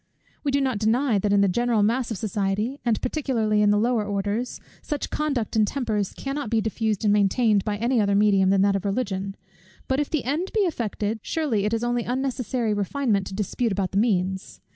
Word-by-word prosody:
We 290 - 0
do 280 0 +2
not 260 -6 0
deny 225 +1 +2
that 205 +1 0
in 200 0 +4
the 200 - +4
general 235 +2 +1
mass 235 +3 +1
of 225 - -3
society, 210 +6 -2
and 235 -3 +1
particularly 230 -8 0
in 210 - +4
the 205 - +4
lower 230 0 +1
orders, 205 +4 -2 0.2
such 295 -2 -4
conduct 275 -8 -1
and 215 -1 +3
tempers 215 -7 -1
cannot 275 -2 -4
be 225 - +2
diffused 220 -1 -1
and 205 - +4
maintained 210 0 +3
by 210 -1 -2
any 235 +2 +1
other 200 -1 +2
medium 200 -2 +4
than 195 0 +4
that 200 0 +3
of 195 - -2
Religion. 195 -2 -2 0.5
But 265 +1 +1
if 295 - -1
the 310 -5 -1
end 310 +9 -1
be 430 - +3
effected, 225 - -1
surely 245 -11 -1
it 210 - 0
is 225 - -3
only 240 0 0
unnecessary 250 -2 -1
refinement 205 -1 0
to 190 - -6
dispute 215 +3 -1
about 190 -1 -1
the 195 - +1
means. 190 -4 -1
220 Hz, 205 wpm, -24 LUFS, 200-250 Hz, 0.5 s, in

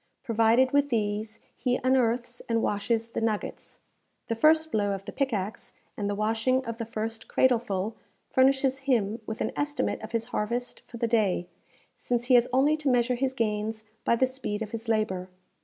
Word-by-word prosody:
Provided 230 +3 +3
with 285 0 +3
these, 215 -1 -2
he 250 0 0
unearths 245 -1 +1
and 230 -1 +1
washes 225 +2 0
the - - -3
nuggets. 220 -2 -3 0.5
The 230 - +1
first 315 +5 +4
blow 205 -2 +1
of 195 0 -6
the - - -6
pickaxe, 220 -6 -2 0.2
and 205 -1 -2
the 205 - -1
washing 225 +5 +1
of 230 0 -5
the 230 - -3
first 225 0 -4
cradleful 225 -5 +1 0.3
furnishes 265 0 +3
him 225 -3 +1
with 220 - -5
an - - 0
estimate 290 0 -1
of 220 0 -8
his 230 -1 -1
harvest 240 +4 -2
for 235 - -9
the 235 0 0
day; 205 -6 +1 0.4
since 240 -1 -2
he 255 - +3
has 245 0 +6
only 275 +4 +4
to 300 -3 0
measure 245 0 +3
his 260 +1 -1
gains 220 -1 -1 0.2
by - - +3
the 260 - +3
speed 255 -5 -4
of 215 - -8
his 230 0 -5
labour. 190 -5 0
230 Hz, 180 wpm, -27 LUFS, 215-255 Hz, 0.5 s, has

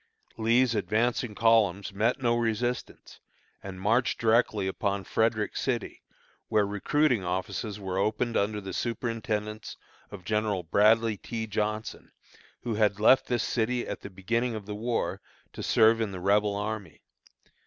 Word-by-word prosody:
Lee's 115 +2 +3
advancing 110 +3 0
columns 105 -4 +2
met 115 +7 +1
no 120 -2 +2
resistance, 120 +1 -3 0.4
and 95 -1 -8
marched 115 +6 +1
directly 110 -3 +2
upon 100 +1 -2
Frederick 110 -1 0
City, 120 -4 -2 0.5
where 105 -1 +2
recruiting 115 +4 +1
offices 95 +3 -3
were 95 -1 -3
opened 110 +4 0
under 105 +1 0
the 95 -1 -7
superintendence 110 -3 -3 0.3
of 95 -3 -10
General 105 -3 0
Bradley 110 +5 +3
T. 110 +3 -5
Johnson, 105 0 -3 0.5
who 120 - -2
had 105 -1 +1
left 120 +5 +5
this 120 -2 0
city, 120 +1 -1
at - - -5
the - - -8
beginning 115 +6 -1
of 105 -2 -7
the 105 - -5
war, 115 +3 -2 0.3
to - - -7
serve 115 +1 +4
in 110 -3 -1
the 95 - -6
Rebel 100 +2 +2
army. 100 -6 -5
110 Hz, 145 wpm, -28 LUFS, 100-115 Hz, 0.5 s, left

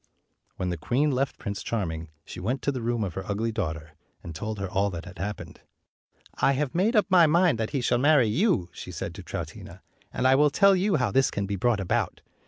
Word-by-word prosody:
When 90 -1 -2
the 90 - -3
queen 135 - +1
left 135 +1 -1
Prince 100 -1 -5
Charming, 80 -8 -3 0.2
she - - -8
went 125 +8 -2
to 140 - +1
the 130 -3 -4
room 120 -1 -1
of 95 -4 -4
her 95 - -5
ugly 110 +3 -1
daughter, 80 -7 -4 0.3
and 85 - -7
told 105 +7 -4
her 100 -1 -3
all 100 +2 0
that 85 -3 -7
had - - -11
happened. 105 +2 -6 0.7
"I 140 - +2
have 140 0 -1
made 205 +8 +1
up 210 - +4
my 180 -4 +6
mind 170 -5 +3
that 110 - -1
he 140 -3 -2
shall 120 0 +1
marry 145 -2 +5
you," 145 - +1
she 90 - -8
said 85 0 -5
to 95 - -9
Troutina; 90 - -8 0.3
"and 130 - +1
I 130 - +6
will 145 +2 +5
tell 195 +7 +5
you 190 +1 +1
how 125 -7 +1
this 135 +4 +3
can 100 - -2
be 100 +1 -3
brought 110 +2 +1
about. 95 - -1
115 Hz, 230 wpm, -26 LUFS, 95-145 Hz, 0.7 s, my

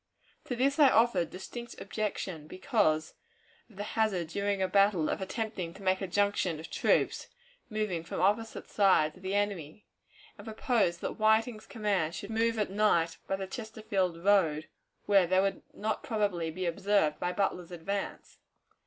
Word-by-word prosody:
To 250 - -3
this 275 +5 +1
I 285 -3 +8
offered 220 -9 +3
distinct 235 +6 -8
objection, 195 -5 -4
because 160 -4 +1 0.6
of 215 - -19
the 205 - -4
hazard 205 -6 0
during 200 +2 -1
a 190 - +1
battle 195 -4 +3
of - - -2
attempting 190 -4 -4
to 200 - -12
make 185 0 +1
a 195 - -2
junction 190 -3 +1
of 160 - -9
troops - - +1 0.4
moving 215 -7 -2
from 165 - -5
opposite 210 +5 0
sides 185 -6 +3
of - - -16
the 190 +1 -2
enemy; 205 -4 -2 0.5
and 205 - -10
proposed 220 -5 0
that - - -4
Whiting's 220 +1 +2
command 195 -7 -1
should 200 - -6
move 230 +1 +1
at 210 -3 -1
night 195 -5 +2
by 195 - 0
the 195 0 -4
Chesterfield 205 -5 -2
road, 165 -6 +3 0.4
where 195 -3 +4
they 185 +2 +3
would 195 0 0
not 215 +1 -2
probably 200 -7 -1
be 180 +3 -4
observed 170 -2 +1
by 180 - -1
Butler's 180 -2 -1
advance. 195 +4 -5
195 Hz, 160 wpm, -30 LUFS, 175-215 Hz, 0.6 s, I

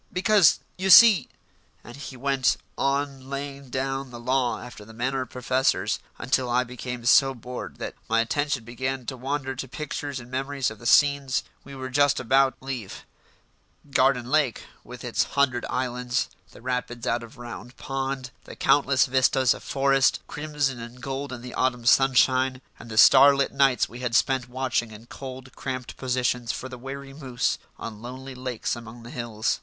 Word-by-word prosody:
Because, 200 -2 +4 0.2
you 190 +1 0
see 215 +1 +8 0.3
" - - -37
And 120 - -11
he 140 -2 -8
went 135 0 +1 0.2
on 140 -1 -1
laying 140 -1 -6
down 135 +1 -2
the 120 -1 -9
law 125 0 0
after 125 -4 -10
the 110 +2 -14
manner 130 +3 -1
of 130 - -6
professors, 130 +1 0 0.2
until 125 0 0
I 125 +1 +2
became 125 -1 -7
so 135 +2 +5
bored 125 +1 -7
that - - -5 0.2
my 115 +1 +3
attention 140 +2 0
began 130 +2 -4
to 130 - -4
wander 135 +1 -3
to 135 +1 -5
pictures 145 0 -5
and 120 +1 -12
memories 135 -1 -1
of 110 - -11
the 120 - -5
scenes 140 -1 +4 0.2
we 140 0 -11
were 130 -1 -6
just 145 +1 +3
about 135 +2 +3
to - - -18
leave: 125 -8 -6 0.9
Garden 130 -2 +3
Lake, 145 -3 +1 0.2
with 125 0 -10
its 120 -2 0
hundred 130 -3 +2
islands; 125 0 -1 0.2
the - - -16
rapids 125 -1 -3
out 120 -1 0
of 115 +3 -12
Round 120 +1 -9
Pond; 135 -1 -4
the - - -10
countless 140 -1 +3
vistas 130 0 +3
of - - -10
forest, 135 -1 +2
crimson 145 -4 -2
and 120 +2 -9
gold 135 +2 -4
in 120 -2 -7
the 125 - -8
autumn 125 -2 0
sunshine; 130 0 +4 0.2
and 115 - -11
the 110 - -6
starlit 140 +3 +7
nights 135 -3 +3
we 120 - -10
had 125 -2 -2
spent 125 +1 +2
watching 125 -2 -1
in 110 +1 -12
cold, 130 0 -9
cramped 130 -2 -5
positions 125 -2 -1
for 130 - -6
the 125 -1 -9
wary 135 +1 -8
moose 130 -4 -2 0.2
on 110 -2 -8
lonely 130 +2 -8
lakes 125 -2 -3
among 115 0 -10
the 120 - -10
hills. 115 -2 -2
130 Hz, 175 wpm, -25 LUFS, 120-135 Hz, 0.9 s, see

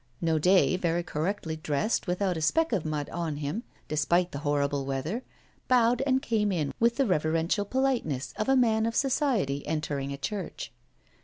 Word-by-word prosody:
Naudet, 175 +3 +3
very 170 0 0
correctly 165 +1 -2
dressed, 155 +8 -1
without 180 +1 0
a 160 - -3
speck 320 - +2
of 185 -7 0
mud 150 -2 -2
on 165 -3 -2
him, 150 +9 -3 0.3
despite 170 +4 +1
the 140 - -5
horrible 145 -1 0
weather, 140 - -3 0.5
bowed 245 0 +4
and 265 0 +2
came 210 -5 +1
in 155 -6 -1
with 235 +1 +3
the 275 - +2
reverential 165 +1 +1
politeness 240 - -1
of 215 - -2
a 270 - +5
man 225 -3 +3
of 230 - -3
society 245 - +1
entering 145 -3 -2
a 140 - -4
church. 195 +6 -5
175 Hz, 165 wpm, -28 LUFS, 150-225 Hz, 0.5 s, a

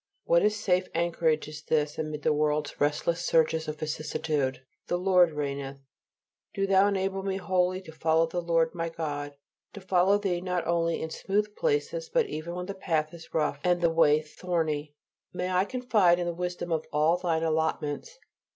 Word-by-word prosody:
What 170 0 +4
a 210 - +4
safe 190 -4 0
anchorage 165 -2 +1
is 150 0 -8
this 150 -1 0
amid 155 -1 -4
the - - +3
world's 150 0 -1
restless 165 +4 +1
surges 160 -1 +2
of 155 0 -4
vicissitude, 150 -3 -2 0.2
"The 175 - 0
Lord 180 -2 +4
reigneth!" 140 -2 -4 0.8
Do 195 - +1
Thou 195 0 +4
enable 195 -1 -1
me 190 0 -2
wholly 185 -1 0
to 160 - -11
follow 160 +1 +2
the 175 +2 -3
Lord 165 -1 +1
my 165 -1 -3
God; 145 -3 -4 0.4
to - - -8
follow 190 +1 +3
Thee 190 -4 -1
not 180 -2 -2
only 170 0 0
in 160 - -5
smooth 210 +4 -1
places, 485 +1 -1
but 485 0 +2
even 165 +3 -5
when 180 0 -4
the 200 - -5
path 160 -5 -1
is 165 -1 -12
rough 150 -3 0
and 180 -1 +2
the 170 -1 +2
way 155 -2 +4
thorny. 155 -2 -2 0.4
May 180 +1 -2
I 185 +1 +2
confide 215 -8 +3
in 175 - -2
the 175 - -2
wisdom 175 0 -4
of 160 -1 -1
all 155 +3 +3
Thine 170 -3 0
allotments. 160 - -1
170 Hz, 180 wpm, -28 LUFS, 155-185 Hz, 0.8 s, What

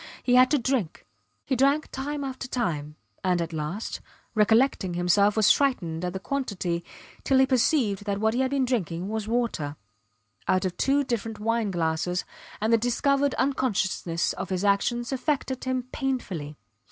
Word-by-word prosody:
He 245 - +2
had 255 +1 +7
to 295 - +3
drink. 245 - -1 0.4
He 265 - 0
drank 280 +4 +2
time 285 +2 -3
after 260 -1 -5
time, 155 - -2 0.3
and, 180 -2 +2
at 165 0 -3
last, 160 +8 -4 0.3
recollecting 215 -3 +3
himself, 200 +4 +3
was 215 -2 +6
frightened 180 - +1
at 180 -1 -2
the 190 - -4
quantity, 190 -9 -2 0.4
till 270 - +3
he 265 - +6
perceived 245 - +1
that 200 -1 -1
what 220 +1 +2
he 245 - 0
had 260 0 +2
been 275 -1 +1
drinking 190 - -2
was 220 -1 -3
water 220 -11 -1 0.7
out 185 0 +2
of 180 -1 -2
two 280 +6 +2
different 225 -4 -3
wine 225 0 0
glasses; 175 0 -1 0.3
and 220 +2 +1
the 230 - +5
discovered 275 +4 +1
unconsciousness 200 -10 0
of - - -5
his 185 +1 -1
actions 235 +5 +1
affected 265 -1 -1
him 255 -1 -1
painfully. 185 - -3
220 Hz, 165 wpm, -26 LUFS, 180-260 Hz, 0.7 s, had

